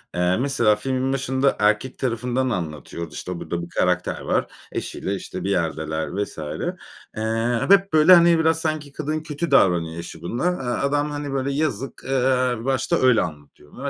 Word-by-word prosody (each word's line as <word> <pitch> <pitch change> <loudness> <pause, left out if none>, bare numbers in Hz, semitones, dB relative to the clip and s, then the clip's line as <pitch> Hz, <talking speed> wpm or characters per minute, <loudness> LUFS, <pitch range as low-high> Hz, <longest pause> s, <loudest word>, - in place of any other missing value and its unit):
Eee, 90 +2 +2
mesela 120 -5 +2
filmin 130 +2 -1
başında, 135 0 +1
erkek 110 +5 +1
tarafından 125 +1 -1
anlatıyordu, 80 - -5
işte 90 -1 -5
burada 85 0 -4
bir 85 - -8
karakter 90 0 0
var, - - 0 0.3
eşiyle 100 - -3
işte 95 -1 -6
bir 95 - -2
yerdeler 80 -3 -1 0.2
vs. - - -10 0.8
eee, 115 +2 0
hep 195 -2 +5
böyle 155 +4 +7
hani, 170 -1 +6
biraz 160 0 +2
sanki 155 -3 -2
kadın 155 +2 -3
kötü 155 +1 -4
davranıyor 85 -9 +3
eşi 85 - -8
buna. 120 - -3
Eee, 130 -6 -2
adam 145 +1 0
hani, 145 -1 -4
böyle 135 +1 -1
yazık. 135 -4 -2
Eee, 130 -1 +2
bir 115 - -8
başta 135 -1 +1
öyle 130 -3 +4
anlatıyor 75 -2 -8
bunu. 140 +2 -5
125 Hz, 170 wpm, -23 LUFS, 90-140 Hz, 0.8 s, böyle